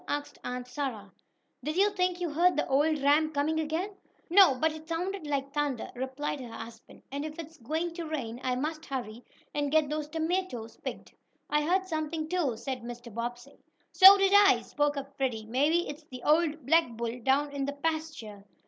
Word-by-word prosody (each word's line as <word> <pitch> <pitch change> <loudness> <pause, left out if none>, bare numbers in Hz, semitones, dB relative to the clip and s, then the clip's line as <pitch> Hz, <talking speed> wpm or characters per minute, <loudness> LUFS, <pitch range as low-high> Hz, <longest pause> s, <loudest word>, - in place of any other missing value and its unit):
asked 290 0 -4
Aunt 250 0 -4
Sarah. 250 -7 -4 0.5
"Did 305 +5 -3
you 405 +2 +4
think 365 -2 0
you 345 -3 -2
heard 345 +3 +3
the - - 0
old 295 +3 +2
ram 305 +2 +4
coming 310 +2 0
again?" 320 +6 -2 0.4
"No, 365 -7 +7
but 315 +5 +1
it 315 +1 -10
sounded 355 0 -3
like 275 -1 -2
thunder," 290 -5 -2
replied 265 +3 -4
her 245 - -8
husband, 225 0 -11
"and 280 +1 -3
if 310 0 -6
it's 325 0 -9
going 320 +8 -2
to 335 -1 -5
rain 250 -6 -4
I 255 -1 0
must 310 +4 -4
hurry, 245 -4 -5 0.3
and 290 -1 -1
get 310 -2 +3
those 300 -1 -2
tomatoes 320 -7 -2
picked." - - -7 0.4
"I 300 0 +3
heard 370 +4 +1
something, 315 -2 -3
too," 310 -10 0
said 250 +2 -4
Mr. 240 -1 -9
Bobbsey. 240 +4 -6 0.3
"So 385 +1 +10
did 390 0 +3
I," 405 -1 +6
spoke 290 -1 0
up 275 0 -6
Freddie. 240 -5 -1
"Maybe 290 +9 +2
it's 295 +2 -8
the 255 -4 -10
old 310 -2 +2
black 325 0 +4
bull 235 +1 -4
down 275 +4 +1
in 280 -1 -2
the 280 - -3
pasture." 290 -9 -4
295 Hz, 190 wpm, -29 LUFS, 255-320 Hz, 0.5 s, So